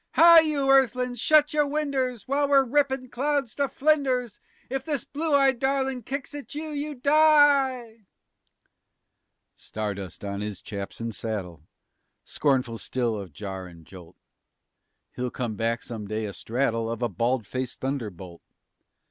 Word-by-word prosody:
_ -, -, -46 dB
Hi! 335 Hz, 0 st, +9 dB
you 300 Hz, -4 st, 0 dB
earthlin's, 250 Hz, -2 st, +2 dB
shut 305 Hz, -1 st, +4 dB
your 295 Hz, -1 st, +2 dB
winders 275 Hz, -5 st, -2 dB
While 280 Hz, +1 st, +1 dB
we're 275 Hz, -1 st, +5 dB
rippin' 265 Hz, -1 st, 0 dB
clouds 275 Hz, -1 st, -1 dB
to 280 Hz, -1 st, 0 dB
flinders. 260 Hz, -6 st, +1 dB, 0.3 s
If 265 Hz, +1 st, -3 dB
this 290 Hz, -3 st, -2 dB
blue 305 Hz, 0 st, -1 dB
eyed 270 Hz, -3 st, +3 dB
darlin' 265 Hz, -1 st, 0 dB
kicks 275 Hz, +5 st, -5 dB
at 290 Hz, 0 st, -8 dB
you, 310 Hz, +1 st, -5 dB
you 295 Hz, 0 st, -4 dB
die!" 275 Hz, -6 st, +3 dB, 1.5 s
Stardust 100 Hz, -3 st, -6 dB
on 100 Hz, 0 st, -4 dB
his 105 Hz, -3 st, -5 dB
chaps 100 Hz, +1 st, -7 dB
and 115 Hz, -1 st, -3 dB
saddle, 90 Hz, -8 st, -6 dB, 0.6 s
Scornful 130 Hz, -5 st, 0 dB
still 120 Hz, -3 st, -1 dB
of 100 Hz, -4 st, -7 dB
jar 95 Hz, +2 st, -7 dB
and 85 Hz, -2 st, -15 dB
jolt, 90 Hz, -1 st, -13 dB, 1.0 s
He'll 125 Hz, 0 st, -2 dB
come 120 Hz, -2 st, -4 dB
back 115 Hz, +2 st, -1 dB
some 110 Hz, -3 st, -7 dB
day, 110 Hz, +1 st, -3 dB
astraddle 115 Hz, +2 st, -2 dB
Of 115 Hz, +1 st, -4 dB
a -, -, +2 dB
bald 115 Hz, +4 st, -1 dB
faced 130 Hz, +4 st, -5 dB
thunderbolt. 100 Hz, -11 st, -5 dB
235 Hz, 145 wpm, -26 LUFS, -, 1.5 s, Hi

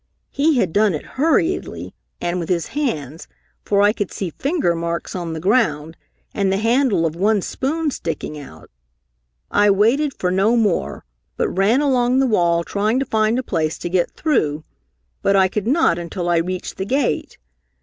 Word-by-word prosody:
He 295 Hz, +1 st, +2 dB
had 185 Hz, -9 st, +1 dB
done 205 Hz, -4 st, +3 dB
it 150 Hz, -, -6 dB
hurriedly 325 Hz, +5 st, -1 dB, 0.3 s
and 175 Hz, +1 st, -2 dB
with 170 Hz, -, -5 dB
his 175 Hz, -2 st, -1 dB
hands, 160 Hz, -, -3 dB, 0.4 s
for 200 Hz, 0 st, +2 dB
I 205 Hz, +1 st, +4 dB
could 205 Hz, -5 st, -3 dB
see 185 Hz, -4 st, -4 dB
finger 280 Hz, -, 0 dB
marks 170 Hz, +1 st, -4 dB
on 170 Hz, -3 st, -4 dB
the 160 Hz, -, -4 dB
ground 165 Hz, -6 st, +1 dB, 0.4 s
and 195 Hz, -2 st, 0 dB
the 195 Hz, -, +1 dB
handle 225 Hz, -4 st, +2 dB
of 160 Hz, -1 st, -2 dB
one 200 Hz, +2 st, +1 dB
spoon 305 Hz, +3 st, -2 dB
sticking 160 Hz, -, -5 dB
out. 140 Hz, -, -12 dB, 0.8 s
I 205 Hz, 0 st, +4 dB
waited 235 Hz, +9 st, +2 dB
for 180 Hz, -, -1 dB
no 200 Hz, +6 st, +2 dB
more, 210 Hz, -6 st, -1 dB, 0.3 s
but -, -, 0 dB
ran 210 Hz, +8 st, +3 dB
along 255 Hz, -3 st, +2 dB
the 270 Hz, -, +3 dB
wall 170 Hz, -7 st, +2 dB
trying 210 Hz, +7 st, 0 dB
to 270 Hz, -, -1 dB
find 220 Hz, 0 st, +1 dB
a 260 Hz, -, -1 dB
place 160 Hz, -7 st, -1 dB
to 175 Hz, -, -5 dB
get 175 Hz, 0 st, +1 dB
through, 155 Hz, -, -1 dB, 0.6 s
but 200 Hz, -, +2 dB
I 190 Hz, -1 st, +5 dB
could 210 Hz, +2 st, -3 dB
not 260 Hz, -, +2 dB
until 175 Hz, +1 st, -4 dB
I 170 Hz, -, +3 dB
reached 180 Hz, +2 st, -3 dB
the 190 Hz, -, -3 dB
gate. 265 Hz, +6 st, -1 dB
200 Hz, 180 wpm, -20 LUFS, 170-250 Hz, 0.8 s, I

